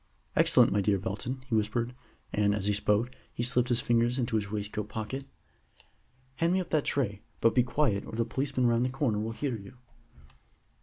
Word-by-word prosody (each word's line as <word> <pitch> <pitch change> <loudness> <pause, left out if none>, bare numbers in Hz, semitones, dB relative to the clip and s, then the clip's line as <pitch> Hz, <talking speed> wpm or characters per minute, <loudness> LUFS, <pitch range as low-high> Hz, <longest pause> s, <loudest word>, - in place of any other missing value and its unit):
"Excellent, - - +5
my 100 +1 +2
dear 100 0 +2
Belton," 125 +6 -4
he 130 - -6
whispered; 110 +3 0 0.4
and, 105 -1 +2
as 100 -2 -3
he 105 - +2
spoke, 105 +4 +1 0.2
he 120 - -3
slipped 125 0 +2
his 120 -1 +3
fingers 120 +1 +2
into 125 -2 -1
his 105 -2 0
waistcoat 105 0 -3
pocket. 115 +6 -5 1.1
"Hand 170 +1 +2
me 190 - +3
up 180 - -5
that 155 -3 +2
tray, 105 -8 -1 0.2
but 115 - +4
be 125 - +5
quiet, 120 -4 +1
or - - -9
the 115 +1 0
policeman 130 +1 -1
round 120 0 +3
the 125 - +1
corner 130 -5 0
will 110 +1 -2
hear 130 +1 -2
you." 110 +4 -11
115 Hz, 195 wpm, -29 LUFS, 105-130 Hz, 1.1 s, Excellent